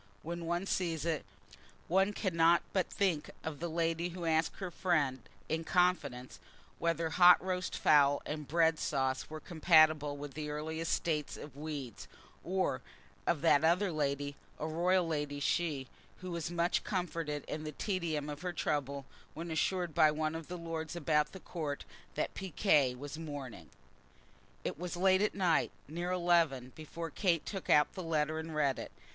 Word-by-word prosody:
When 170 +1 -5
one 175 +2 0
sees 165 -5 -1
it, 165 -3 0 0.6
one 190 +3 +3
cannot 170 -4 +3
but 190 -2 +1
think 180 -7 0
of 155 -3 -5
the 170 - -3
lady 165 +1 0
who 175 0 -6
asked 160 0 +2
her 185 -2 -5
friend, 150 -8 +1 0.3
in 160 +1 -1
confidence, 160 -9 0 0.4
whether 165 -1 0
hot 180 +3 +8
roast 185 0 -2
fowl 145 -2 +5
and 150 -1 -4
bread 160 0 +3
sauce 135 -2 -1
were 155 0 -6
compatible 155 -3 +4
with 145 -1 -7
the 150 +1 -4
earliest 160 +2 -3
state 150 -3 -1
of 145 -3 -10
weeds; 145 -6 -6 0.4
or 185 -7 0 0.5
of 165 -4 +2
that 160 -2 +5
other 180 +4 +3
lady, 145 -2 -1 0.2
a - - -4
royal 175 +3 +2
lady 145 -2 -2
she, 145 -2 0 0.4
who 185 -1 -5
was 170 -2 -3
much 175 +1 +1
comforted 165 -6 -2
in 155 - -4
the 155 - -4
tedium 165 -4 -2
of 145 0 -6
her 180 -1 -3
trouble 140 -3 -2 0.3
when 165 +2 -5
assured 175 +1 0
by 155 -1 +6
one 155 +1 -1
of 165 -1 -6
the 180 - -5
lords 165 -1 -5
about 150 -2 +1
the 190 - -9
Court 155 -6 -4 0.3
that - - -1
piquet 155 -8 +2
was 145 +4 -7
mourning. 140 - -7 0.9
It - - -4
was 180 0 -4
late 190 +1 +4
at 210 - +1
night, 180 -5 +2 0.2
near 175 +4 -3
eleven, 170 -8 +2
before 165 +1 -7
Kate 170 -4 +1
took 195 -3 -5
out 150 0 +6
her 185 - -4
letter 160 -2 0
and 160 0 -6
read 140 -3 +1
it. - - -7
160 Hz, 165 wpm, -33 LUFS, 150-175 Hz, 0.9 s, hot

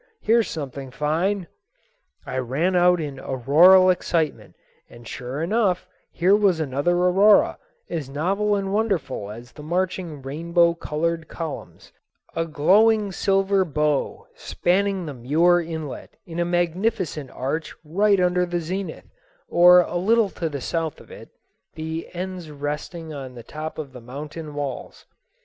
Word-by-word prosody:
Here's 230 0 +2
something 140 -3 -6
fine." 170 +8 -1 0.8
I 130 - -3
ran 145 +9 0
out 180 0 +4
in 145 -4 -5
auroral 170 +10 +5
excitement, 165 -4 -2 0.3
and 120 -1 -14
sure 130 +7 -5
enough 195 -1 +1 0.2
here 185 +4 +3
was 200 -5 +3
another 145 +3 0
aurora, 190 +4 +4 0.3
as 155 -6 -4
novel 195 +9 0
and 195 -1 -2
wonderful 180 - -1
as 115 +3 -10
the 150 - -12
marching 175 -2 -2
rainbow 170 +5 +2
colored 165 0 -2
columns—a 165 +1 -7
glowing 205 +7 +3
silver 195 +1 +2
bow 150 -3 -1
spanning 195 0 0
the 150 - -5
Muir 160 +8 +3
Inlet 160 -4 -7
in 170 0 -6
a 170 - +1
magnificent 175 - -1
arch 145 +5 -4
right 200 +6 +2
under 180 0 +2
the 175 0 -1
zenith, 185 +4 -5 0.4
or 180 +1 +7
a 175 - -3
little 215 +3 +2
to 165 - -3
the 140 -3 -5
south 165 +3 -2
of - - -16
it, - - -11 0.5
the 160 +1 -5
ends 180 -2 -5
resting 150 +3 -5
on 135 -3 -8
the 120 - -9
top 155 +4 -7
of 140 -4 -6
the 125 - -10
mountain 150 +5 -8
walls. 145 -2 -5
170 Hz, 140 wpm, -23 LUFS, 150-185 Hz, 0.8 s, or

